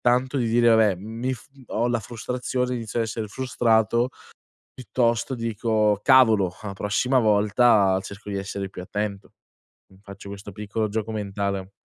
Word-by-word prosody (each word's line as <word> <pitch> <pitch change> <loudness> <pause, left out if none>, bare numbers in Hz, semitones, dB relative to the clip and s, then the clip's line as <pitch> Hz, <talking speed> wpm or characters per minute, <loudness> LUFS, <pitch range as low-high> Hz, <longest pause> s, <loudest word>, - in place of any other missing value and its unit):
tanto 125 +3 +1
di 120 - 0
dire: 120 +1 +4
"Vabbè, 110 -4 +4
mi 115 +6 -4
f" 115 - -9 0.3
ho 120 +2 +1
la 120 -1 0
frustrazione, 125 +3 -3
inizio 115 -1 -4
a - - +3
essere 110 -1 -4
frustrato, 115 -1 +1 0.6
piuttosto 120 +2 0
dico: 110 -2 +1
"Cavolo, 110 -9 +5
la 100 -2 -5
prossima 125 +7 +1
volta, 105 -2 +4
cerco 100 +1 -9
di 100 - -2
essere 100 0 -4
più 90 - -9
attento". 100 +1 -4 0.6
Mi 95 - -20
faccio 100 0 -11
questo 100 0 -8
piccolo 105 +2 -3
gioco 110 +1 -3
mentale. 100 -2 -3
110 Hz, 150 wpm, -24 LUFS, 100-120 Hz, 0.6 s, Cavolo